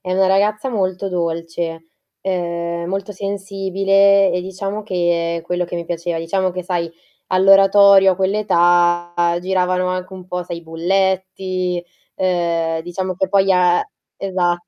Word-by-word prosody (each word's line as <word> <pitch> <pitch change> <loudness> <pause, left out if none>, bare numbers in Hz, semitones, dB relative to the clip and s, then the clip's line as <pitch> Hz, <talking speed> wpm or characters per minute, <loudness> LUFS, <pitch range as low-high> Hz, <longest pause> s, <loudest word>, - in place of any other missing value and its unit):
è 185 - -4
una 190 0 +3
ragazza 210 +6 +1
molto 190 -3 -2
dolce, 165 -1 -4 0.3
ehm, 170 -2 -3
molto 195 +2 -4
sensibile, 195 0 +2
e 180 - -1
diciamo 195 +3 -5
che 175 -4 -1
è 165 - -9
quello 180 +1 -1
che 175 - -5
mi 170 - -4
piaceva. 170 0 -3
Diciamo 185 +3 -1
che 180 0 -5
sai 170 -2 -2 0.4
all'oratorio 195 0 +6
a - - -5
quell' 190 +2 0
età 175 -3 +2 0.3
giravano 185 0 0
anche 185 +1 -4
un 185 -1 -11
po' 180 0 -4
sai 170 0 -6
i 170 - -13
bulletti, 185 +1 -1 0.3
ehm, 170 -3 0
diciamo 185 +2 -4
che 190 +1 -1
poi 195 0 +3
a 180 -1 +3 0.3
Esat 175 -2 -1
185 Hz, 145 wpm, -19 LUFS, 175-195 Hz, 0.4 s, all'oratorio